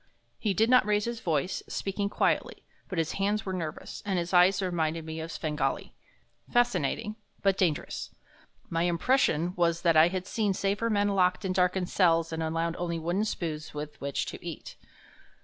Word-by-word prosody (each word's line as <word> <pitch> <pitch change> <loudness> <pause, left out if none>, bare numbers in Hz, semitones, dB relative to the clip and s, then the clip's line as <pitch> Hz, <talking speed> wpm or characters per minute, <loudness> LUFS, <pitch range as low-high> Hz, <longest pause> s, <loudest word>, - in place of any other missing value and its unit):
He 205 -4 0
did 220 +4 +4
not 250 +1 +6
raise 210 0 +1
his 235 -1 -3
voice, 165 0 -1
speaking 200 +1 -2
quietly, - - 0 0.3
but 185 - -4
his 165 -1 0
hands 205 +2 0
were 190 - -3
nervous, 160 -4 -5
and 195 -2 -1
his 175 +1 -2
eyes 180 +2 +6
reminded 165 -4 -1
me 160 0 -5
of 160 +1 -5
Svengali 155 -2 -2 0.6
fascinating, 215 - +1 0.3
but 195 -1 +4
dangerous. 170 -6 -1 0.6
My 165 0 -1
impression 175 - +2
was 170 -1 +1
that 165 -2 +4
I 155 +1 +7
had 185 0 -3
seen 205 -2 0
safer 205 +4 0
men 205 -1 +2
locked 185 0 +2
in 185 - 0
darkened 180 0 +1
cells 165 -3 +3
and 160 - -2
allowed 165 +1 -1
only 170 -1 -2
wooden 175 +6 0
spoons 160 -7 -4
with 150 0 -6
which 140 0 -2
to - - -8
eat. - - -7
180 Hz, 175 wpm, -29 LUFS, 165-200 Hz, 0.6 s, I